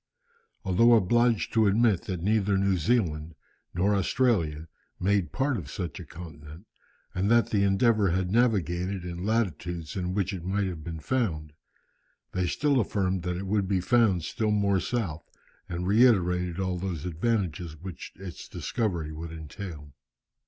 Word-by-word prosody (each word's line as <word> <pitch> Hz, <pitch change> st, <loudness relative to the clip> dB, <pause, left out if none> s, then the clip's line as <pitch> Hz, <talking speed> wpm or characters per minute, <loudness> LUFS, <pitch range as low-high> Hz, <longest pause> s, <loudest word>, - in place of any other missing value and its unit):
Although 115 Hz, +6 st, +5 dB
obliged 115 Hz, +2 st, +2 dB
to 110 Hz, -2 st, +4 dB
admit 105 Hz, -2 st, +3 dB
that 90 Hz, -3 st, -4 dB
neither 105 Hz, -1 st, +2 dB
New 100 Hz, 0 st, +2 dB
Zealand 85 Hz, -5 st, 0 dB, 0.4 s
nor 95 Hz, +4 st, +1 dB
Australia 95 Hz, -7 st, +1 dB, 0.3 s
made 95 Hz, -4 st, +1 dB
part 135 Hz, -1 st, 0 dB
of 75 Hz, -9 st, -7 dB
such 85 Hz, -2 st, -5 dB
a -, -, -8 dB
continent, 80 Hz, +1 st, -11 dB, 0.5 s
and 95 Hz, +2 st, 0 dB
that 115 Hz, 0 st, +4 dB
the 105 Hz, -, +2 dB
Endeavour 100 Hz, +1 st, +3 dB
had 90 Hz, +1 st, 0 dB
navigated 95 Hz, -5 st, +1 dB
in 90 Hz, 0 st, -5 dB
latitudes 90 Hz, -6 st, -2 dB
in 90 Hz, -1 st, -2 dB
which 100 Hz, -1 st, 0 dB
it 90 Hz, -3 st, -6 dB
might 100 Hz, +2 st, 0 dB
have 85 Hz, -4 st, -5 dB
been 80 Hz, -1 st, -6 dB
found, 80 Hz, -, -1 dB, 0.8 s
they 90 Hz, -1 st, 0 dB
still 145 Hz, -, +2 dB
affirmed 95 Hz, -4 st, 0 dB
that 90 Hz, 0 st, -2 dB
it 95 Hz, -, -4 dB
would 100 Hz, 0 st, 0 dB
be 95 Hz, -1 st, +1 dB
found 100 Hz, -3 st, +3 dB
still 110 Hz, +6 st, -1 dB
more 100 Hz, -2 st, +2 dB
south, 90 Hz, -9 st, -3 dB, 0.4 s
and 85 Hz, 0 st, -3 dB
reiterated 90 Hz, -5 st, +3 dB
all 95 Hz, -2 st, -1 dB
those 90 Hz, -4 st, -4 dB
advantages 90 Hz, -3 st, -1 dB
which 90 Hz, +2 st, -8 dB
its 95 Hz, -1 st, -9 dB
discovery 85 Hz, -9 st, -2 dB
would 80 Hz, +1 st, -7 dB
entail. 80 Hz, -2 st, -8 dB
95 Hz, 150 wpm, -27 LUFS, 85-105 Hz, 0.8 s, Although